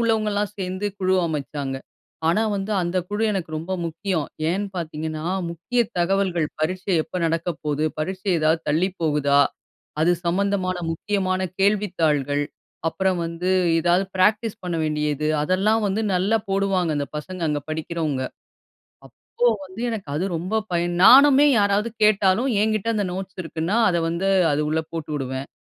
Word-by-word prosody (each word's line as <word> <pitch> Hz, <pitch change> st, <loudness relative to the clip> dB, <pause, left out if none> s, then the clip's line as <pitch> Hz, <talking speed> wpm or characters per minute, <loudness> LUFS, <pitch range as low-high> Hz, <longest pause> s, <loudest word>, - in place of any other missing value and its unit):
உள்ளவங்கலாம் 215 Hz, -3 st, 0 dB
சேர்ந்து 185 Hz, +2 st, -3 dB
குழு 185 Hz, 0 st, +2 dB
அமைச்சாங்க. 145 Hz, -3 st, -3 dB, 0.5 s
ஆனா, 210 Hz, +7 st, +3 dB
வந்து 195 Hz, +2 st, -3 dB
அந்த 175 Hz, +2 st, -1 dB
குழு 205 Hz, +2 st, -2 dB
எனக்கு 185 Hz, -5 st, -3 dB
ரொம்ப 165 Hz, +4 st, -5 dB
முக்கியம். 165 Hz, -1 st, -2 dB, 0.3 s
ஏன்னு 200 Hz, +3 st, -1 dB
பார்த்தீங்கன்னா, 155 Hz, -1 st, -4 dB, 0.3 s
முக்கிய 175 Hz, +9 st, -1 dB, 0.2 s
தகவல்கள் 175 Hz, -2 st, +1 dB
பரீட்சை 185 Hz, +4 st, -1 dB
எப்போ 185 Hz, -, -8 dB
நடக்க 165 Hz, +2 st, -1 dB, 0.2 s
போகுது? 150 Hz, +1 st, 0 dB
பரீட்சை 190 Hz, +4 st, -2 dB
ஏதாவது 160 Hz, +1 st, +2 dB
தள்ளி 165 Hz, +6 st, +2 dB
போகுதா? 145 Hz, -3 st, +3 dB, 0.6 s
அது 165 Hz, +3 st, +4 dB
சம்மந்தமான 185 Hz, +1 st, 0 dB, 0.2 s
முக்கியமான 190 Hz, +1 st, -1 dB, 0.2 s
கேள்வித்தாள்கள், 160 Hz, -9 st, +1 dB, 0.5 s
அப்புறம் 190 Hz, +1 st, 0 dB
வந்து 170 Hz, +2 st, -3 dB, 0.3 s
ஏதாவது 175 Hz, +3 st, +2 dB
ப்ராக்டிஸ் 215 Hz, +3 st, +2 dB
பண்ண 175 Hz, -2 st, -2 dB
வேண்டியது 150 Hz, 0 st, -1 dB
அதெல்லாம் 205 Hz, +6 st, +2 dB
வந்து 200 Hz, +2 st, 0 dB
நல்லா 195 Hz, +5 st, +2 dB
போடுவாங்க. 195 Hz, -3 st, +1 dB
அந்த 145 Hz, -1 st, -1 dB
பசங்க 185 Hz, +4 st, -6 dB
அங்க 145 Hz, -1 st, -1 dB
படிக்கிறவங்க. 155 Hz, -3 st, -2 dB, 0.8 s
அப்போ 125 Hz, -, -26 dB, 0.4 s
வந்து 185 Hz, +5 st, -9 dB
எனக்கு 215 Hz, -6 st, -5 dB
அது 170 Hz, -, -1 dB
ரொம்ப 185 Hz, +6 st, -3 dB, 0.2 s
பயன். 175 Hz, 0 st, 0 dB
நானுமே 280 Hz, +4 st, +8 dB
யாராவது 205 Hz, +3 st, +2 dB
கேட்டாலும் 210 Hz, +4 st, +3 dB
ஏங்கிட்ட 215 Hz, 0 st, 0 dB
அந்த 205 Hz, -2 st, 0 dB
நோட்ஸ் 190 Hz, 0 st, -6 dB
இருக்குன்னா, 165 Hz, +6 st, -2 dB
அத 170 Hz, -, +1 dB
வந்து 175 Hz, +4 st, -1 dB, 0.2 s
அது 145 Hz, +1 st, +1 dB
உள்ள 160 Hz, +1 st, +1 dB
போட்டு 160 Hz, -2 st, -5 dB
விடுவேன். 130 Hz, 0 st, -4 dB
185 Hz, 140 wpm, -23 LUFS, 160-200 Hz, 0.8 s, நானுமே